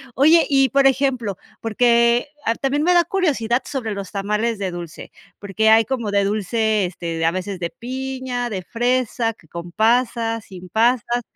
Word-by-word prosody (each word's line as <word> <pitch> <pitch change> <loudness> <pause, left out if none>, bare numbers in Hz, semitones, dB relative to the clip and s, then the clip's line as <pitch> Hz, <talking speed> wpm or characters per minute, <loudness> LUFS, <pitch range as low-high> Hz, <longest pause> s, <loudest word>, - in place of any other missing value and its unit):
Oye, 315 +5 +5
y, 270 -2 +3
por 275 +2 +4
ejemplo, 255 -7 0 0.2
porque, 235 +2 +2 0.2
ah, 230 - +1
también 275 +3 -1
me 355 +3 +3
da 345 - +6
curiosidad 275 - 0
sobre 235 -6 -4
los 200 -2 -7
tamales 210 +3 -1
de 195 -2 -3
dulce, 175 -2 -8 0.3
porque 205 +2 0
hay 220 0 +6
como 235 -2 -3
de 200 0 +2
dulce, 215 +1 0
este, 170 -2 -5
de 165 - 0
a - - +5
veces 185 +1 -5
de 170 -1 -3
piña, 255 0 -4
de 190 -4 -4
fresa, 240 0 0
que 165 - -23
con 170 +2 -8
pasas, 230 +1 +1
sin 185 -1 -11
pasas. 240 +3 +1
230 Hz, 175 wpm, -21 LUFS, 200-255 Hz, 0.3 s, da